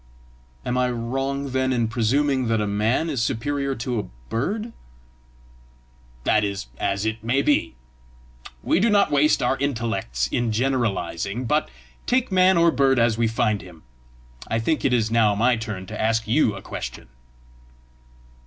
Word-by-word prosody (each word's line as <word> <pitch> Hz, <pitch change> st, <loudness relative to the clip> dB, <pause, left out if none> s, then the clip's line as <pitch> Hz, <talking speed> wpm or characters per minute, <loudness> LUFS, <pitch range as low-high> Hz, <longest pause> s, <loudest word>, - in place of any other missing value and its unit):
"Am 125 Hz, +1 st, 0 dB
I 125 Hz, 0 st, +2 dB
wrong, 135 Hz, +3 st, -3 dB
then, 130 Hz, 0 st, 0 dB
in 120 Hz, -3 st, +1 dB
presuming 130 Hz, +3 st, +1 dB
that 115 Hz, -1 st, +1 dB
a 105 Hz, -, 0 dB
man 105 Hz, +9 st, 0 dB
is 140 Hz, -7 st, -1 dB
superior 140 Hz, +3 st, -1 dB
to 120 Hz, 0 st, -2 dB
a -, -, -2 dB, 0.3 s
bird?" 210 Hz, -, -2 dB, 1.5 s
"That 105 Hz, +9 st, +3 dB
is 100 Hz, -8 st, -3 dB
as 100 Hz, +2 st, -1 dB
it 110 Hz, 0 st, -3 dB
may 130 Hz, +5 st, +1 dB
be. 145 Hz, -, +1 dB, 0.9 s
We -, -, +2 dB
do 225 Hz, +4 st, +3 dB
not 205 Hz, -1 st, +3 dB
waste 145 Hz, 0 st, +3 dB
our 130 Hz, +2 st, +1 dB
intellects 110 Hz, -, -1 dB
in 120 Hz, -2 st, 0 dB
generalising, 115 Hz, -3 st, -1 dB
but 150 Hz, +5 st, +1 dB, 0.4 s
take 255 Hz, -3 st, +1 dB
man 185 Hz, 0 st, +4 dB
or 170 Hz, 0 st, +5 dB
bird 135 Hz, -2 st, +2 dB
as 115 Hz, -1 st, +3 dB
we 115 Hz, -, +3 dB
find 110 Hz, -2 st, 0 dB
him. 90 Hz, -4 st, -14 dB, 0.6 s
I 115 Hz, -, 0 dB
think 150 Hz, +8 st, 0 dB
it 135 Hz, -, +2 dB
is 115 Hz, -3 st, +1 dB
now 110 Hz, -3 st, +3 dB
my 120 Hz, +4 st, +3 dB
turn 110 Hz, -4 st, -5 dB
to 105 Hz, +3 st, -6 dB
ask 115 Hz, 0 st, +1 dB
you 115 Hz, -3 st, +2 dB
a 95 Hz, -, -9 dB
question!" -, -, -7 dB
120 Hz, 160 wpm, -23 LUFS, 110-140 Hz, 1.5 s, or